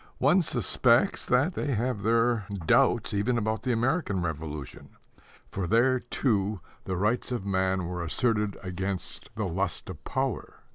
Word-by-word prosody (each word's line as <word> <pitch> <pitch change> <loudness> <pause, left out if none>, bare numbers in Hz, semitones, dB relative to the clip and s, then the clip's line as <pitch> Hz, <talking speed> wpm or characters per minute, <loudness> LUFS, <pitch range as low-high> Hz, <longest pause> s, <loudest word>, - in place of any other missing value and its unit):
One 155 +8 +4
suspects 120 - +2
that 130 +9 +3
they 140 -6 -1
have 120 -1 -1
their 115 -1 +2 0.2
doubts - - +3
even 105 +4 +1
about 110 -1 -1
the 125 - -1
American 120 - 0
Revolution; 75 -3 -6 0.5
for 95 -3 -3
there, 125 +6 +3
too, 105 -5 0 0.3
the 95 - -2
rights 105 +7 0
of 120 -6 -3
man 95 -1 0
were 90 0 -4
asserted 105 +2 0
against 95 +1 -4
the 110 -1 -2
lust 95 +2 -2
of 80 -3 -12
power. 130 +3 -3
105 Hz, 145 wpm, -28 LUFS, 95-125 Hz, 0.5 s, One